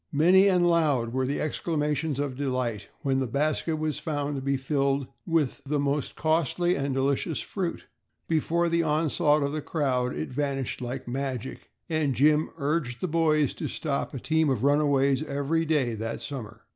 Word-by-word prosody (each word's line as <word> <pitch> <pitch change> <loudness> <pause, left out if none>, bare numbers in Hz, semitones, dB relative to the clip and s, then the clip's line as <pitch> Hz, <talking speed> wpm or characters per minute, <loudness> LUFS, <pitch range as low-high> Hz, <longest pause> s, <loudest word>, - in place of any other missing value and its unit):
Many 180 +6 +5
and 180 -2 +4
loud 150 -9 +2
were 130 0 0
the 140 - -1
exclamations 150 -2 -1
of 140 -2 -2
delight 125 -7 -2
when 135 -4 +1
the 130 - -1
basket 155 +5 0
was 155 -2 -2
found 145 -2 -2
to 135 - -3
be 140 0 0
filled 140 0 0 0.2
with 165 -6 +1
the 145 +2 -1
mostly 140 0 -1
costly 165 +3 +1
and 140 -1 -1
delicious 140 +5 0
fruit. 185 -4 -4 0.4
Before 170 +2 +1
the 170 0 +2
onslaught 150 -1 +2
of 140 - -1
the 155 +1 -3
crowd 130 -6 -1
it 80 - -3
vanished 135 -1 -2
like 125 +1 -5
magic 130 -1 -4 0.2
and 155 -5 0
Jim 150 +5 +3
urged 140 -4 -1
the 185 - -1
boys 155 -3 +2
to - - -4
stop 140 -2 -3
a - - -3
team 160 +3 +1
of 130 -3 0
runaways 140 -2 +3
every 155 +2 -1
day 145 -7 +1
that 115 +1 -4
summer. 115 -6 -7
145 Hz, 170 wpm, -27 LUFS, 135-155 Hz, 0.4 s, Many